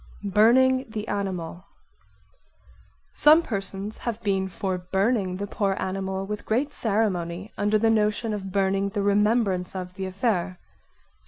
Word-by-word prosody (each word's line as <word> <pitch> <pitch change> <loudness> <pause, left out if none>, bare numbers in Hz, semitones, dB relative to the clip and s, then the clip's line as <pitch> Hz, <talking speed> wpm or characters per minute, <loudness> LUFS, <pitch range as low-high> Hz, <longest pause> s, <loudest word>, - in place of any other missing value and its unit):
Burning 260 +5 +5
the 215 -1 -5
animal 185 -4 -3 1.5
Some 310 +3 +6
persons 200 - -4
have 230 -2 -3
been 195 -2 0
for 185 0 -3
burning 190 +1 0
the 200 - -3
poor 200 -1 -1
animal 190 0 -3
with 210 +1 -5
great 270 +7 0
ceremony 200 -3 -1
under 210 +1 +2
the 225 +1 +3
notion 215 +1 +1
of 195 -2 -5
burning 195 0 +1
the 200 0 -2
remembrance 205 -2 +2
of 180 -1 -5
the 190 0 -4
affair. 185 -2 -1
200 Hz, 135 wpm, -25 LUFS, 190-220 Hz, 1.5 s, Some